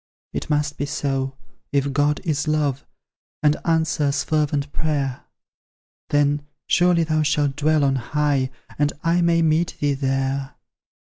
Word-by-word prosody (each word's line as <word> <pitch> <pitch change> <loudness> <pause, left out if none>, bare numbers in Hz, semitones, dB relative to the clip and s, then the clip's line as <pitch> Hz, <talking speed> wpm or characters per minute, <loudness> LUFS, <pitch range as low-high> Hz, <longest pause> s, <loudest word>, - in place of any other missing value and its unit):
It - - -4
must 150 0 0
be 145 - -1
so, 135 -2 -2 0.4
if 140 -1 +1
God 145 +1 +1
is 150 -2 -1
love, 145 -3 0 0.6
And 150 0 +4
answers 160 -4 +1
fervent 145 -2 0
prayer; 140 -5 -2 0.8
Then 145 0 +1 0.2
surely 175 -1 +3
thou 155 -1 +1
shalt 150 -2 +1
dwell 155 +1 +2
on 135 -1 +2
high, 140 +1 0 0.3
And 145 0 +2
I 170 +1 +2
may 170 -1 +3
meet 160 +2 +1
thee 145 -1 +1
there. 135 0 -1
145 Hz, 135 wpm, -22 LUFS, 140-155 Hz, 0.8 s, And